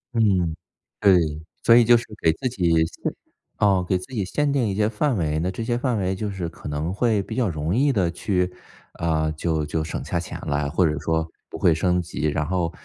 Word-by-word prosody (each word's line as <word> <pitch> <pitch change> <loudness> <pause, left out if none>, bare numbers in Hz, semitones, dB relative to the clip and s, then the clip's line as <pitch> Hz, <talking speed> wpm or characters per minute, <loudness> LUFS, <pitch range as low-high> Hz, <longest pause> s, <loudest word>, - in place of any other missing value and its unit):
嗯， 95 -8 +2 0.4
对， 85 -7 +3 0.2
所 115 - +7
以 120 - +7
就 120 +1 +6
是 115 - -5 0.2
给 80 - +4
自 130 - -3
己 95 -9 0 0.2
限 - - -4 0.4
啊， 95 -3 +3
给 90 +1 +1
自 90 +8 -10
己 105 -5 -1
限 145 +9 0
定 130 -5 +1
一 95 - -2
些 105 +1 +2
范 115 +3 0
围， 80 -3 0
那 90 +3 0
这 95 +5 -4
些 120 +1 0
范 125 -1 0
围 95 -2 0
就 105 +2 -3
是 95 -3 -4
可 80 - -9
能 75 +4 -2
会 110 -1 +1
比 110 - -7
较 120 -5 +1
容 80 +2 -2
易 140 +4 +3
地 95 -9 +1
去， 90 0 -1 0.4
啊， 80 -2 0
就 80 0 -1
就 80 +1 -2
省 80 - -5
下 85 - -1
钱 85 - -6
啦， 70 0 -1
或 85 +4 +2
者 75 -2 -1
说 80 +1 0 0.2
不 - - -7
会 85 - +4
升 90 +2 +1
级。 85 -3 -2
然 75 0 0
后 85 0 -1
90 Hz, 245 characters per minute, -23 LUFS, 80-110 Hz, 0.4 s, 所